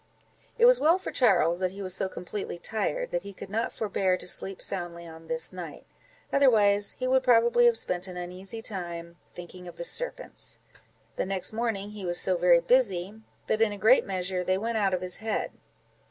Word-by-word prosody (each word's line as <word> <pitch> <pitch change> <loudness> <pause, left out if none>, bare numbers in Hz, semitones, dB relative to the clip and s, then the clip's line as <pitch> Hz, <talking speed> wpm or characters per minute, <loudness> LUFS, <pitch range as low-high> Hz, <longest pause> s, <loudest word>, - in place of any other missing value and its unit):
It 475 - +5
was - - +7
well 330 +4 +4
for 375 - -6
Charles 175 - +3
that 185 -1 0
he 195 +2 -8
was 185 -1 -1
so 190 - -1
completely 190 0 -6
tired, 205 -2 -3
that 175 - -1
he 200 +1 -10
could - - -10
not 225 +2 -1
forbear 195 -3 0
to - - -7
sleep 195 +1 +2
soundly 170 -1 -2
on 160 0 -12
this 160 +2 -2
night, 175 -4 -9 0.5
otherwise 210 -7 +4
he 255 - -3
would 260 +1 +3
probably 240 -1 +4
have 235 -1 +3
spent 180 -3 -2
an 180 -1 -8
uneasy 185 +5 -5
time, 170 -4 -6 0.2
thinking 180 +1 -10
of 175 - -10
the 170 - -6
serpents. - - 0 0.6
The - - -1
next 195 +1 -2
morning 215 -3 -2
he 210 -2 -9
was 175 -1 +1
so 185 - +2
very 175 -1 +4
busy, 205 -2 +1 0.2
that 220 - -1
in 225 -2 +3
a 205 - -6
great 220 +6 +5
measure 185 -1 -3
they 185 +1 +1
went 225 +2 -2
out 195 -2 +1
of 180 - -5
his 180 0 -5
head. 220 0 -3
195 Hz, 200 wpm, -27 LUFS, 180-225 Hz, 0.6 s, was